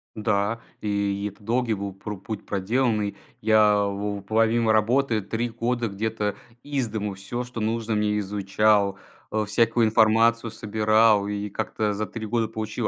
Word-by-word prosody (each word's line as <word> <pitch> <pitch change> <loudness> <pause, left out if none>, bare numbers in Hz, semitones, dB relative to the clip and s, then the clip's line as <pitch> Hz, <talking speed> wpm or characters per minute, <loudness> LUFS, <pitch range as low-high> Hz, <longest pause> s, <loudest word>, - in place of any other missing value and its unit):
Да, 105 +1 0 0.2
и 100 -1 -1
это 100 - -21
долгий 115 +1 0
был 100 -1 -5
про 105 +2 -7
путь 100 +2 -7
проделанный. 105 +1 0 0.3
Я 105 -1 +4
вов 100 0 -3
помимо 115 +1 +2
работы 115 +1 +2
3 115 +4 -2
года 120 +1 -1
где-то 105 0 -2 0.3
из 140 -4 -1
дому 105 -2 -3
всё, 95 +6 -5
что 125 -1 -7
нужно 110 0 -1
мне 105 0 +1
изучал. 100 0 +2 0.3
Э, 110 -1 0
всякую 115 +2 +2
информацию 115 +1 +3
собирал 110 -1 +3
и 105 0 -3
как-то 105 +1 -2
за 105 +1 -3
3 115 -2 -6
года 115 +1 0
получил 110 +1 -3
110 Hz, 150 wpm, -25 LUFS, 105-115 Hz, 0.3 s, Я